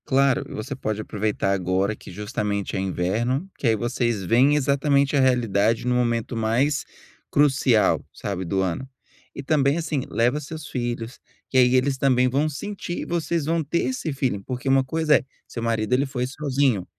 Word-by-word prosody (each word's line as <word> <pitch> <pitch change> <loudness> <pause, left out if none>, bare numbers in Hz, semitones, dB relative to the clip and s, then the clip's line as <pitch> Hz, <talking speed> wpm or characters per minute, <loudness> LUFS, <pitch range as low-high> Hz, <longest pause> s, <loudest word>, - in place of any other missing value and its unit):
Claro. 135 -1 +2
E - - -8
você 125 +6 -5
pode 110 -4 -3
aproveitar 105 -2 -1
agora 95 +2 0
que - - -12
justamente 105 -1 -3
é - - 0
inverno, 110 - -1
que 135 - -1
aí 110 - +4
vocês 120 -1 -1
veem 125 +9 +4
exatamente 140 0 +2
a - - +4
realidade 115 -3 +2
no 125 - +2
momento 120 -1 0
mais 120 +6 +1 0.4
crucial, 135 -6 +3
sabe, 95 -2 -4
do 95 +3 0
ano. 95 +8 -2 0.5
E - - -6
também, 140 +1 +2
assim, 155 -4 -1
leva 120 +5 +1
os 150 - -6
seus 155 0 -7
filhos, 120 -1 -4 0.3
que 130 - 0
aí 125 0 +5
eles 135 +1 +2
também 130 -2 +3
vão 140 +5 +1
sentir 175 +3 -5
e - - -4
vocês 170 -2 -1
vão 165 +1 0
ter 165 +4 -1
esse 255 -11 -3
feeling, 130 -7 -1
porque 125 +5 -6
uma 135 0 +4
coisa 155 +3 +2
é 145 - -6 0.2
seu 115 - -6
marido, 115 0 0
ele 135 +3 +3
foi 125 -2 -2
sozinho. 135 - 0
130 Hz, 185 wpm, -24 LUFS, 110-140 Hz, 0.5 s, aí